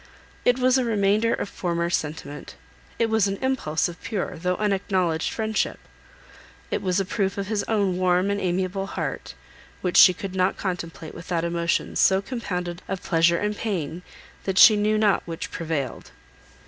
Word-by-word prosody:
It 245 0 +4
was 255 0 +3
a - - +1
remainder 215 0 +2
of - - -1
former 170 -3 -2
sentiment; 150 -2 -4 0.4
it 230 - +2
was 220 -2 +2
an 195 0 -2
impulse 260 -13 0
of 175 -1 -10
pure, 205 -4 -3
though 180 +3 -1
unacknowledged 190 -5 0
friendship; 220 -1 -1 0.9
it - - -1
was 185 0 +1
a 195 - 0
proof 195 0 -1
of 200 - -2
his 215 -2 0
own 200 -5 +1
warm 185 +1 +2
and 200 0 -1
amiable 185 +2 -1
heart, - - -5 0.5
which 180 -1 0
she 185 - +9
could 190 +1 -6
not 185 0 +1
contemplate 170 -4 -5
without 170 -1 -3
emotions 170 0 -1
so 190 0 +5
compounded 180 -6 -4
of 195 -1 -4
pleasure 170 0 +3
and 210 +2 -1
pain, 175 -6 -3 0.4
that 190 -1 -1
she 215 - +9
knew 210 +1 +2
not 210 -2 +3
which 165 0 -5
prevailed. 155 -5 -4
190 Hz, 165 wpm, -24 LUFS, 170-210 Hz, 0.9 s, she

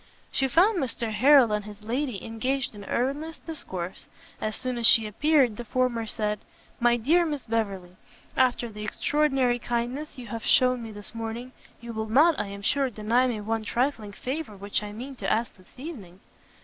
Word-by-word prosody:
She 270 - +2
found 360 - +4
Mr 235 -4 -1
Harrel 260 +1 +6
and 210 0 0
his 210 0 -11
lady 245 -1 -2
engaged 255 +4 -2
in 205 -1 -10
earnest 290 +9 -2
discourse; 190 - -6 0.3
as 215 -1 -2
soon 255 -2 -3
as 230 - +5
she 225 -2 +7
appeared, 255 +1 +2
the 240 - -5
former 240 -1 0
said, 210 -1 -1 0.4
"My 240 0 +4
dear 315 +10 +3
Miss 295 -5 -3
Beverley, 195 -6 -2 0.4
after 250 -2 +2
the 210 -2 -8
extraordinary 265 +1 +1
kindness 245 +6 -3
you 250 - -8
have 225 0 -6
shewn 255 -1 +4
me 225 -1 -7
this 205 +1 -10
morning, 230 +2 -5 0.3
you 235 0 -7
will 220 0 -3
not, 300 +8 +5
I 205 - -1
am 200 0 -8
sure, 275 +4 +2
deny 235 +3 +2
me 225 -4 -2
one 225 +1 -2
trifling 235 -2 -1
favour 260 -2 -5
which 200 +2 -2
I 210 0 -6
mean 250 +6 -7
to 195 -3 -2
ask 230 +2 0
this 185 -1 -21
evening." 230 - -9
235 Hz, 185 wpm, -27 LUFS, 210-265 Hz, 0.4 s, she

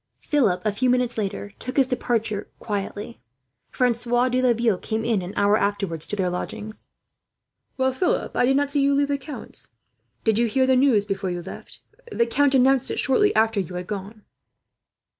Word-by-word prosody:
Philip, 240 - +1
a 215 - +2
few 250 +5 0
minutes 250 -1 +1
later, 205 -1 -3
took 255 - -5
his 270 - +6
departure 230 -4 -2
quietly. 205 +1 -5 0.5
Francois 245 0 +1
de 255 +1 +1
Laville 235 -5 +2
came 220 0 -3
in, 225 -4 +1
an 180 +1 -6
hour 205 +1 +3
afterwards, 200 -6 -1
to - - -3
their 190 -3 0
lodgings. 215 +4 -6 0.9
"Well, 260 0 +1
Philip, 360 +8 -1
I - - +3
did 270 +1 +3
not 285 0 0
see 285 -1 +2
you 280 0 +3
leave 285 0 +1
the 280 -1 0
count's. 290 +2 -8 0.6
Did 220 -1 +2
you 235 - +3
hear 260 +4 +2
the 260 0 +3
news 250 -6 +3
before 195 -2 -3
you 175 -1 -4
left? 190 - -11 0.3
The 235 - +2
count 275 +4 +2
announced 265 0 +3
it - - -3
shortly 410 +11 +3
after 220 -1 +2
you 180 -1 -4
had 180 0 -4
gone." 205 +2 -7
230 Hz, 185 wpm, -23 LUFS, 205-260 Hz, 0.9 s, his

